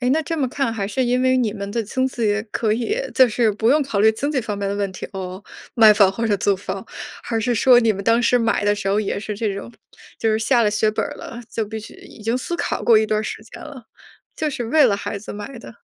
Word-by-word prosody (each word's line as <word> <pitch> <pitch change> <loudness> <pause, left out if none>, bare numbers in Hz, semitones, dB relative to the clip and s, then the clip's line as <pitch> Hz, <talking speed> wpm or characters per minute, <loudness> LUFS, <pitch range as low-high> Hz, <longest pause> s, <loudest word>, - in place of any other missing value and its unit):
诶， 250 - 0
那 315 +3 +2
这 330 +2 -3
么 270 - +1
看 270 -4 -1
还 200 -3 -3
是 235 +6 -1
因 250 +1 +1
为 260 0 +3
你 230 -5 +1
们 200 -2 -6
的 230 - -1
经 260 +5 -1
济 215 -5 0
可 215 -2 0
以 245 - -1 0.2
就 260 -2 +6
是 225 0 +2
不 220 +2 0
用 295 +3 +4
考 260 -7 -3
虑 220 +2 +5
经 285 +7 -2
济 270 -4 0
方 210 -3 -4
面 200 -1 -2
的 200 - -2
问 200 -1 -1
题 - - -7
哦， 190 0 -6 0.3
买 220 -2 +7
房 200 -2 +4
或 230 +3 -3
者 205 -2 +2
租 200 0 +1
房。 190 0 -6 0.4
还 225 -1 -2
是 245 +2 0
说 245 +2 +6
你 225 -2 +3
们 195 0 -6
当 230 +1 +3
时 245 +2 +3
买 230 -3 +1
的 205 - +3
时 200 -1 -6
候 200 +2 +2
也 200 -1 -2
是 210 0 -5
这 210 -1 -2
种， 215 +4 -8 0.5
就 225 - +1
是 215 - +1
下 235 +2 +2
了 210 - +2
血 210 +1 +1
本 215 - -1
儿 - - -6
了， 235 - -8
就 225 - -2
必 220 +1 -6
须 215 - -12
已 215 - -14
经 230 +3 0
思 345 +6 -4
考 - - -2
过 230 -2 +6
一 220 - +4
段 215 0 0
时 220 - -5
间 225 - -13
了， 265 -7 -10 0.5
就 310 - -1
是 245 -4 -4
为 300 +4 +4
了 205 -5 +3
孩 200 - -5
子 205 - -9
买 210 +5 -8
的。 230 - -13
220 Hz, 300 characters per minute, -21 LUFS, 205-245 Hz, 0.5 s, 买